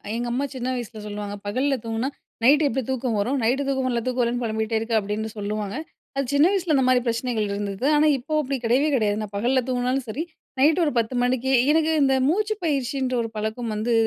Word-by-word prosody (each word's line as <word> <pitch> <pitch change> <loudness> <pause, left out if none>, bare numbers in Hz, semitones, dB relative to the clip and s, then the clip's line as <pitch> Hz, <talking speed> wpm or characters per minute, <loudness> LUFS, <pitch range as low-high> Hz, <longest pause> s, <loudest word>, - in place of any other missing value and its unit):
எங்க 240 +1 -2
அம்மா 265 +4 0
சின்ன 250 0 -3
வயசில 235 -3 -6
சொல்லுவாங்க. 205 0 -5
"பகல்ல 260 +7 +1
தூங்குனா 225 +2 -2 0.4
நைட்‌டு 290 +4 +6
எப்டி 265 +1 -1
தூக்கம் 250 -4 -1
வரும்? 255 +7 0
நைட்‌டு 255 +5 +2
தூக்கம் 265 -1 0
வர்ல்ல, 240 -2 0
தூக்கம் 255 0 0
வர்ல்லன்னு 240 +1 -1
பொலம்பிட்டே 220 0 -1
இருக்க" 225 +1 -4
அப்பிடின்னு 210 +2 -3
சொல்லுவாங்க. 205 0 -3 0.4
அது 275 - +1
சின்ன 285 +2 +5
வயசில 365 -5 +1
அந்தமாரி 255 -2 +4
பிரச்சனைகள் 230 -2 -1
இருந்தது. 200 +4 -3
ஆனா, 300 +1 +4
இப்போ 280 +5 -6
அப்டி 275 -1 -2
கெடையவே 260 +6 +3
கெடையாது. 210 -4 +1
நான் 210 -1 -6
பகல்ல 255 +4 +2
தூங்குனாலும் 250 +1 0
சரி, 255 +8 -3 0.4
நைட்‌டு 310 +6 +4
ஒரு 295 - +1
10:00 230 +2 +1
மணிக்கு, 255 +1 +1 0.2
எனக்கு 320 +1 +3
இந்த 270 -1 +3
மூச்சு 420 +7 +1
பயிற்சின்ற 265 -4 0
ஒரு 225 - -3
பழக்கம் 220 +2 -3
வந்து 225 +3 0
245 Hz, 195 wpm, -24 LUFS, 220-270 Hz, 0.4 s, நைட்‌டு